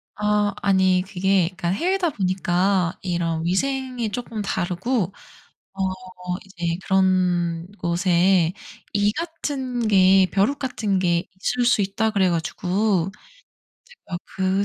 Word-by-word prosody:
아 210 -1 +1
아니 190 -2 +3
그게 190 -2 +2
그니까 180 -1 -5
해외다 355 - +1
보니까 185 - 0
이런 170 -3 -1
위생이 250 +4 -1
쪼끔 225 0 -4
다르고 190 +2 -1 0.6
어 195 - -9 0.6
이제 170 -3 -3
"그런 180 -3 +1
곳에 175 0 +2 0.4
이 205 0 +2
같은 270 -6 -3
게, 190 -1 +6
벼룩 210 +9 +1
같은 220 -7 -1
게 175 -2 +1
있을 245 +4 0
수 245 -2 +3
있다." 200 +3 0
그래 195 -3 +2
가지고 180 +2 0 0.7
제가 475 - -8 0.2
그 190 +1 +1
195 Hz, 215 characters per minute, -23 LUFS, 180-215 Hz, 0.7 s, 게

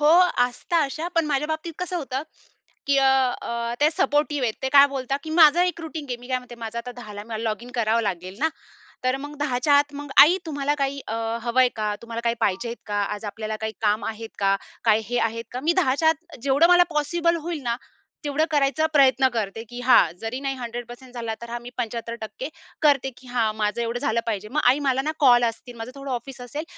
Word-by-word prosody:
हो, 295 - +4 0.4
असतात 310 +7 -1
अशा, 315 +5 -4
पण 330 -2 +2
माझ्या 295 0 0
बाबतीत 315 +1 -3
कसं 360 0 -3
होतं 270 -4 -3 0.7
की 280 - +3
अ, 270 - +4 0.4
अ, 235 0 -3
ते 300 - +6
सपोर्टिव्ह 290 -3 +1
आहेत. 220 - 0
ते 265 - -1
काय 280 0 +9
बोलतात 275 0 -3
की 315 - -7
माझा 320 +1 +6
एक 355 -2 -2
रूटीन 315 -2 -6
आहे. 245 - -2
मी 245 +1 -13
काय 255 -1 +1
म्हणते, 250 -1 -10
माझं 230 0 -6
आता 245 +1 -7
10 240 -4 -10
ला 205 0 -7
मला 220 0 -5
लॉगिन 230 +3 -3
करावं 230 0 +2
लागेल 185 -1 -4
ना. 320 +2 +2 0.5
तर 255 +1 +2
मग 290 +2 -8
10 275 -4 0
च्या 290 - +4
आत 290 0 +1
मग, 290 -1 -7
"आई 345 +6 +7
तुम्हाला 290 -2 -1
काही 275 0 -1
अ, - - -3 0.3
हवंय 250 +2 +3
का? 210 -1 -1
तुम्हाला 230 0 -5
काही 235 0 +1
पाहिजे 230 +3 0
का? 205 -1 -1
आज 210 +1 -7
आपल्याला 215 +1 -4
काही 220 0 -3
काम 210 0 +1
आहेत 225 0 -5
का? 195 0 +3 0.3
काय 220 -1 +4
हे 245 +1 -1
आहेत 230 +1 -6
का?" 250 - -4
मी 335 +2 +3
10 295 -8 +2
च्या 320 +1 +4
आत 330 +1 -4
जेवढं 280 +5 +4
मला 355 0 +7
पॉसिबल 335 +3 +1
होईल 335 -4 -3
ना 235 -1 0 0.5
तेवढं 295 +2 +1
करायचा 285 +1 +2
प्रयत्न 265 -2 +5
करते, 225 0 -3
की 245 0 -7
हां 245 -10 +5
जरी 225 +4 -3
नाही 275 -1 -2
100% 245 +1 -8
झाला, 230 -2 -4
तर 235 - -8
हां, 240 0 -4
मी 240 - -9
75% 235 - -5 0.3
करते 280 -3 +3
की 255 - -16
हां, 230 -3 0
माझं 210 +2 0
एवढं 235 +1 -2
झालं 225 0 0
पाहिजे. 210 -2 -3
"मग 300 +4 0
आई 275 - 0
मला 265 0 +1
ना 305 +3 -1
कॉल 245 -4 +6
असतील. 235 +2 -5
माझं 225 +2 -6
थोडं 275 -1 -6
ऑफिस 255 +1 -5
असेल. 290 +5 -5
255 Hz, 225 wpm, -24 LUFS, 230-290 Hz, 0.7 s, काय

